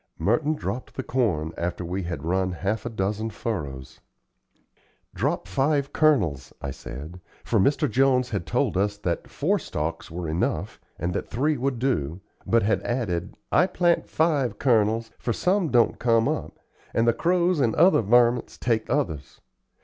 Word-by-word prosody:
Merton 145 Hz, +9 st, +1 dB
dropped 130 Hz, -3 st, -5 dB
the 130 Hz, -, -3 dB
corn 90 Hz, -13 st, 0 dB
after 90 Hz, +1 st, -3 dB
we 90 Hz, +3 st, -3 dB
had 85 Hz, -2 st, -5 dB
run 95 Hz, +1 st, 0 dB
half 100 Hz, +6 st, -2 dB
a -, -, -3 dB
dozen 105 Hz, +1 st, -2 dB
furrows. 70 Hz, -, -5 dB, 1.1 s
"Drop -, -, -1 dB
five 140 Hz, +7 st, 0 dB
kernels," 100 Hz, -, +2 dB
I 70 Hz, -, -4 dB
said; 80 Hz, +7 st, -9 dB, 0.2 s
for 115 Hz, -, +1 dB
Mr. 140 Hz, +10 st, +3 dB
Jones 130 Hz, +1 st, +2 dB
had 100 Hz, -6 st, -3 dB
told -, -, 0 dB
us 100 Hz, +1 st, 0 dB
that 85 Hz, -4 st, -3 dB
four -, -, 0 dB
stalks 80 Hz, +2 st, -4 dB
were 85 Hz, 0 st, -5 dB
enough 80 Hz, +2 st, -2 dB, 0.2 s
and 85 Hz, +3 st, -2 dB
that -, -, -3 dB
three 145 Hz, +6 st, +1 dB
would 130 Hz, 0 st, -1 dB
do, 95 Hz, -, -1 dB, 0.3 s
but 115 Hz, 0 st, +3 dB
had 110 Hz, +2 st, +1 dB
added: 100 Hz, -7 st, -2 dB
"I 180 Hz, -, +4 dB
plant 175 Hz, -2 st, +1 dB
five 145 Hz, -9 st, +1 dB
kernels, 115 Hz, -2 st, +2 dB
for 120 Hz, -, -1 dB
some 180 Hz, -, +1 dB
don't 120 Hz, -3 st, +3 dB
come 115 Hz, -2 st, +3 dB
up, -, -, -3 dB, 0.4 s
and 115 Hz, +1 st, +3 dB
the 115 Hz, -, +5 dB
crows 175 Hz, +3 st, +2 dB
and 115 Hz, -5 st, +2 dB
other 175 Hz, -3 st, +5 dB
vermints 120 Hz, +2 st, +3 dB
take 115 Hz, -2 st, 0 dB
others. 80 Hz, -, -2 dB
115 Hz, 160 wpm, -25 LUFS, 90-130 Hz, 1.1 s, the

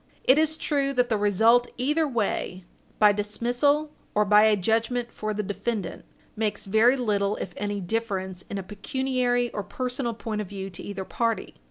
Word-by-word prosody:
It 265 Hz, +4 st, +5 dB
is 315 Hz, 0 st, +2 dB
true 280 Hz, -3 st, 0 dB
that 250 Hz, -1 st, +2 dB
the 225 Hz, -, +2 dB
result 225 Hz, +4 st, +4 dB
either 300 Hz, +5 st, +1 dB
way, 205 Hz, -6 st, -2 dB, 0.3 s
by 210 Hz, -1 st, +6 dB
dismissal 245 Hz, +9 st, 0 dB, 0.2 s
or 210 Hz, 0 st, +4 dB
by 210 Hz, +1 st, +6 dB
a 215 Hz, -1 st, +5 dB
judgment 230 Hz, +4 st, 0 dB
for 215 Hz, 0 st, -4 dB
the 210 Hz, 0 st, -2 dB
defendant, 205 Hz, +1 st, -4 dB, 0.3 s
makes 210 Hz, -1 st, -2 dB
very 220 Hz, +6 st, +4 dB
little, 205 Hz, -4 st, 0 dB
if 180 Hz, -, -6 dB
any, 205 Hz, 0 st, -3 dB
difference 190 Hz, -2 st, -3 dB
in 200 Hz, -, -4 dB
a 195 Hz, -, -4 dB
pecuniary 245 Hz, +4 st, -1 dB
or 205 Hz, -, -3 dB
personal 250 Hz, +3 st, -3 dB
point 215 Hz, -1 st, -3 dB
of 205 Hz, -, -6 dB
view 195 Hz, -1 st, -6 dB
to 175 Hz, -, -9 dB
either 195 Hz, -2 st, -5 dB
party. 230 Hz, +1 st, -1 dB
220 Hz, 175 wpm, -26 LUFS, 205-245 Hz, 0.3 s, by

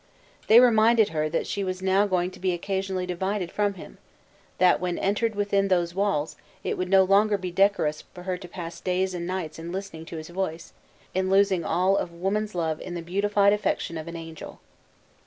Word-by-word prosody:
They 225 Hz, +2 st, +8 dB
reminded 230 Hz, -2 st, +5 dB
her 155 Hz, -1 st, -1 dB
that 165 Hz, -, -1 dB
she 200 Hz, -, -3 dB
was 185 Hz, 0 st, -4 dB
now 190 Hz, +2 st, +3 dB
going 180 Hz, -1 st, 0 dB
to 185 Hz, -, -13 dB
be 185 Hz, -1 st, 0 dB
occasionally 190 Hz, +1 st, -2 dB
divided 185 Hz, +1 st, -2 dB
from 205 Hz, -1 st, 0 dB
him; 175 Hz, -, -12 dB, 0.6 s
that 180 Hz, 0 st, +4 dB
when 180 Hz, -1 st, -2 dB
entered 210 Hz, +3 st, 0 dB
within 200 Hz, -1 st, +1 dB
those 175 Hz, -3 st, +1 dB
walls, 195 Hz, -6 st, 0 dB, 0.3 s
it -, -, -1 dB
would 185 Hz, 0 st, -3 dB
no 190 Hz, 0 st, +6 dB
longer 205 Hz, +2 st, +3 dB
be 185 Hz, -2 st, -5 dB
decorous 175 Hz, -5 st, +2 dB
for 180 Hz, -, -9 dB
her 185 Hz, 0 st, -2 dB
to 180 Hz, 0 st, -9 dB
pass 170 Hz, -1 st, -8 dB
days 185 Hz, 0 st, 0 dB
and 175 Hz, -1 st, -4 dB
nights 180 Hz, -4 st, -4 dB
in 165 Hz, +1 st, -6 dB
listening 185 Hz, -4 st, -6 dB
to 165 Hz, -, -7 dB
his 155 Hz, +1 st, -8 dB
voice, 175 Hz, -2 st, -4 dB, 0.4 s
in 185 Hz, 0 st, 0 dB
losing 195 Hz, -2 st, +3 dB
all 190 Hz, +2 st, +2 dB
of 175 Hz, -, -2 dB
woman's 195 Hz, +4 st, -2 dB
love 160 Hz, -3 st, -1 dB
in 175 Hz, -, -6 dB
the 170 Hz, -, -5 dB
beautified 200 Hz, +3 st, +2 dB
affection 205 Hz, -4 st, -1 dB
of 160 Hz, 0 st, -6 dB
an 170 Hz, -, -7 dB
angel. 165 Hz, -1 st, -9 dB
185 Hz, 200 wpm, -26 LUFS, 175-200 Hz, 0.6 s, They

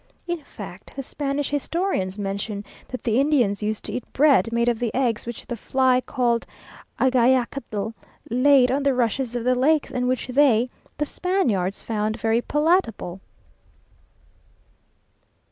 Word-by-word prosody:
In 345 Hz, -3 st, -3 dB
fact -, -, -11 dB
the 275 Hz, -, -4 dB
Spanish 280 Hz, +1 st, -3 dB
historians 290 Hz, -, -1 dB
mention 200 Hz, +1 st, -4 dB, 0.2 s
that 255 Hz, -, -7 dB
the 230 Hz, +1 st, +2 dB
Indians 250 Hz, -9 st, +2 dB
used 215 Hz, 0 st, -2 dB
to -, -, -4 dB
eat 250 Hz, -, -6 dB
bread 260 Hz, -7 st, +4 dB
made 235 Hz, 0 st, +1 dB
of 235 Hz, -2 st, +1 dB
the 240 Hz, -3 st, -1 dB
eggs 240 Hz, -4 st, 0 dB
which 235 Hz, -, -6 dB
the 240 Hz, -, -4 dB
fly 255 Hz, +2 st, +2 dB
called 240 Hz, -3 st, 0 dB, 0.6 s
agayacatl 245 Hz, -4 st, +1 dB, 0.3 s
laid 255 Hz, +1 st, +4 dB
on 275 Hz, +2 st, +1 dB
the 275 Hz, -2 st, +2 dB
rushes 245 Hz, 0 st, 0 dB
of 240 Hz, -, -2 dB
the 250 Hz, +1 st, +3 dB
lakes, 285 Hz, +4 st, +2 dB
and 250 Hz, 0 st, -1 dB
which 255 Hz, -1 st, 0 dB
they 250 Hz, -3 st, +3 dB, 0.3 s
(the 295 Hz, -, 0 dB
Spaniards) 245 Hz, -, -1 dB
found 220 Hz, 0 st, -2 dB
very 225 Hz, +2 st, +2 dB
palatable. 295 Hz, -, 0 dB
250 Hz, 145 wpm, -23 LUFS, 225-275 Hz, 0.6 s, bread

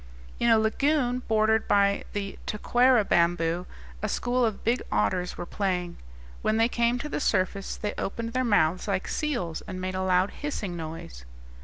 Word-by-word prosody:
In 235 Hz, -, +3 dB
a 225 Hz, -, +6 dB
lagoon 250 Hz, +3 st, +1 dB
bordered 220 Hz, 0 st, +2 dB
by 200 Hz, 0 st, +3 dB
the 200 Hz, -1 st, -4 dB
taquara 245 Hz, +1 st, +3 dB
bamboo 170 Hz, 0 st, +1 dB, 0.3 s
a -, -, -1 dB
school 245 Hz, +1 st, 0 dB
of 220 Hz, -4 st, -1 dB
big 235 Hz, +3 st, +1 dB
otters 105 Hz, -, 0 dB
were -, -, -4 dB
playing; 180 Hz, -3 st, -2 dB, 0.4 s
when 215 Hz, -, +1 dB
they 225 Hz, +1 st, +4 dB
came 235 Hz, 0 st, +1 dB
to 290 Hz, -, -4 dB
the -, -, -3 dB
surface, 195 Hz, -5 st, 0 dB
they 210 Hz, -, -3 dB
opened 230 Hz, +3 st, -3 dB
their 255 Hz, 0 st, +1 dB
mouths 185 Hz, -6 st, +2 dB
like 195 Hz, -2 st, -1 dB
seals, 240 Hz, -, -2 dB
and 185 Hz, 0 st, -5 dB
made 185 Hz, 0 st, -3 dB
a 185 Hz, -, -2 dB
loud 185 Hz, +1 st, +2 dB
hissing 215 Hz, -11 st, -4 dB
noise. 160 Hz, -, -7 dB
205 Hz, 170 wpm, -27 LUFS, 180-235 Hz, 0.4 s, a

